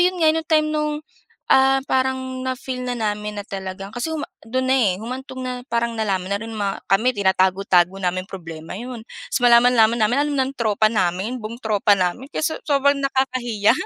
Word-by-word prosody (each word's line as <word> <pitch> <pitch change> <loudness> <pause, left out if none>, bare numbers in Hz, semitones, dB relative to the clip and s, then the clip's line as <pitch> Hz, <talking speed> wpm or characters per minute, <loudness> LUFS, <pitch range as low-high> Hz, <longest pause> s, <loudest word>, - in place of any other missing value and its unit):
'yon 360 0 +2
nga 315 -1 +5
no 325 - -1
time 310 -1 +3
no'ng, 300 0 -2 0.5
ah, 270 0 +5
parang 260 0 -1
na-feel 260 0 -4
na 245 -1 -2
namin 210 -1 -3
na 200 - -8
talagang 195 0 -6
kasi 245 +7 -3
huma 315 -2 -3 0.2
do'n 260 +2 0
na 265 - +4
eh, 220 -8 +3
humantong 260 +3 -6
na 255 - -2 0.2
parang 235 0 0
nalaman 195 -4 -1
na 200 - -1
rin 225 0 -7
ma 205 -3 -2
kami, 225 +6 +3
tinatago-tago 190 -1 +2
naming 185 0 -1
problema, 165 -4 -8
'yon. 240 +1 -7 0.3
So, 245 - +1
malaman-laman 235 -1 +5
namin, 220 +5 +2
alam 290 -1 -2
ng 265 +1 0
tropa 215 -1 +2
namin, 205 +3 -1
buong 230 +3 -7
tropa 210 -1 +2
namin. 185 +9 -1
Kaya 310 - -2
so 315 - 0
sobrang 280 -1 +3
nakakahiya. 255 -6 +1
235 Hz, 185 wpm, -21 LUFS, 200-260 Hz, 0.5 s, nga